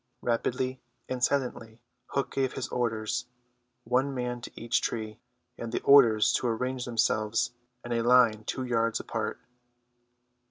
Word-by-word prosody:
Rapidly 125 +2 -1 0.3
and 125 -1 -3
silently 120 -5 -1 0.3
Hook 140 - -2
gave 135 -1 0
his 135 - -4
orders: 120 0 -1 0.6
one 130 +4 +1
man 125 -1 -3
to - - -8
each 115 +1 +1
tree, 110 -1 -4 0.4
and 115 -1 -5
the - - -3
others 120 -7 +7
to 125 - -2
arrange 125 +2 -2
themselves 110 -2 +1 0.3
in 120 - -6
a 115 -1 +1
line 120 -3 +4
two 130 - -3
yards 115 -2 0
apart. 110 -2 -4
120 Hz, 135 wpm, -28 LUFS, 115-125 Hz, 0.6 s, others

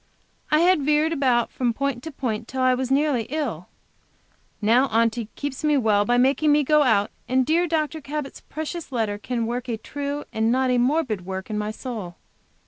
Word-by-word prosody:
I 305 +1 +4
had 360 -2 +4
veered 300 +3 +2
about 255 -5 +1
from 240 -3 -1
point 275 -2 -2
to 320 - -7
point 230 -5 -3
till 260 0 -2
I 255 0 +4
was 255 0 -2
nearly 270 -4 +1
ill. 255 - -3 0.9
Now 235 +5 +4
Aunty 230 -1 +1
keeps 285 0 -5
me 300 -1 +3
well 210 -5 +3
by 245 +2 +2
making 275 +4 +3
me 295 0 +4
go 300 +2 +4
out, 220 -7 +2 0.2
and 260 0 +2
dear 335 +4 +2
Dr. 315 -1 -1
Cabot's 290 0 -5
precious 315 +1 -6
letter 220 -4 -1
can 235 +1 -2
work 240 +2 -3
a 230 -2 -2
true 285 +5 -5
and 220 +1 +1
not 260 +1 +2
a 250 - +2
morbid 250 - +1
work 190 +2 -5
in 210 - -2
my 210 0 -2
soul. 215 -6 -6
255 Hz, 195 wpm, -24 LUFS, 230-295 Hz, 0.9 s, I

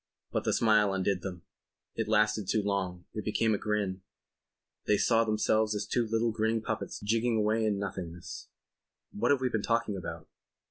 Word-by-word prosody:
But - - -1
the - - +2
smile 105 -3 +4
undid 95 -1 0
them. 90 -2 -6 0.5
It 115 - -2
lasted 105 -2 +2
too 110 +1 +1
long; 95 -3 -2
it 105 - -4
became 110 +1 +1
a 100 - 0
grin. 100 -3 -1 0.9
They 105 - +4
saw 115 +1 +3
themselves 110 0 +1
as 105 - -2
two 120 -2 0
little 115 +1 +1
grinning 110 0 0
puppets 115 -1 -3
jigging 115 +2 +1
away 110 +1 +2
in 105 -2 +1
nothingness. 90 -4 -6 0.6
"What 105 - 0
have 140 -2 +3
we 130 - +1
been 110 -3 -1
talking 115 -2 0
about?" 95 - -6
105 Hz, 175 wpm, -30 LUFS, 100-110 Hz, 0.9 s, smile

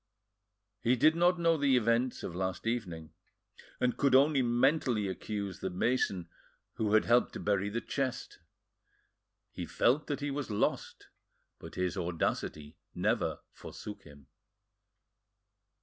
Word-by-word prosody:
He 120 +3 +2
did 155 +6 +4
not 175 +1 +3
know 165 -1 +3
the 140 -3 +3
events 120 +2 +1
of - - -5
last 95 +1 -3
evening, 85 -9 -3 0.7
and 125 -1 +1
could 140 -2 +3
only 140 +1 +5
mentally 120 -2 +2
accuse 100 +1 -4
the 95 - -3
mason 95 -2 0 0.5
who 110 -1 +1
had 110 - +4
helped 120 +1 +3
to - - -6
bury 100 -1 0
the 115 +3 -3
chest. 135 -1 -3 1.1
He - - -6
felt 140 +5 +2
that 145 - -2
he 145 0 -2
was 140 -2 -4
lost, 105 - -2 0.5
but - - -10
his 90 -1 -1
audacity 80 -3 -3 0.2
never - - 0
forsook 105 -1 -9
him. 70 -1 -16
115 Hz, 135 wpm, -31 LUFS, 95-135 Hz, 1.1 s, only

